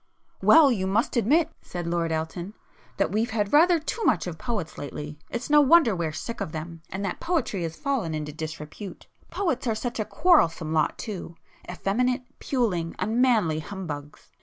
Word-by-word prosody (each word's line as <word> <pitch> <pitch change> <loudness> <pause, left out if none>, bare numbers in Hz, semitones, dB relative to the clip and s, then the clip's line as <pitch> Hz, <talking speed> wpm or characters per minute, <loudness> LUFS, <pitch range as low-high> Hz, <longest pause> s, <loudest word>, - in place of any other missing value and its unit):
"Well, 310 -4 +7
you 190 -5 0
must 210 +7 +1
admit," 300 +8 +3
said 175 -1 -6
Lord 170 -1 0
Elton, 170 +5 -3 0.4
"that - - +1
we've 220 +3 0
had 210 -3 -1
rather 340 +4 +6
too 375 +9 -4
much - - +2
of 170 -3 -6
poets 220 -10 -4
lately. 150 +1 -6
It's 235 +1 -4
no 295 0 +6
wonder 290 - +5
we're 165 -3 -2
sick 220 +8 -6
of 185 -6 -4
them, 165 +1 -6
and 190 +3 -4
that 185 - -3
poetry 315 - -1
has 165 -1 -3
fallen 245 - -1
into 150 -1 -4
disrepute. 155 +5 -7 0.2
Poets 280 -10 -1
are 225 - +1
such 240 +1 -4
a 215 - 0
quarrelsome 165 - +3
lot 155 -2 +1
too—effeminate, 210 +5 -3 0.2
puling, 190 -11 -1
unmanly 220 -6 +2
humbugs!" 150 -5 -7
200 Hz, 165 wpm, -26 LUFS, 165-250 Hz, 0.4 s, Well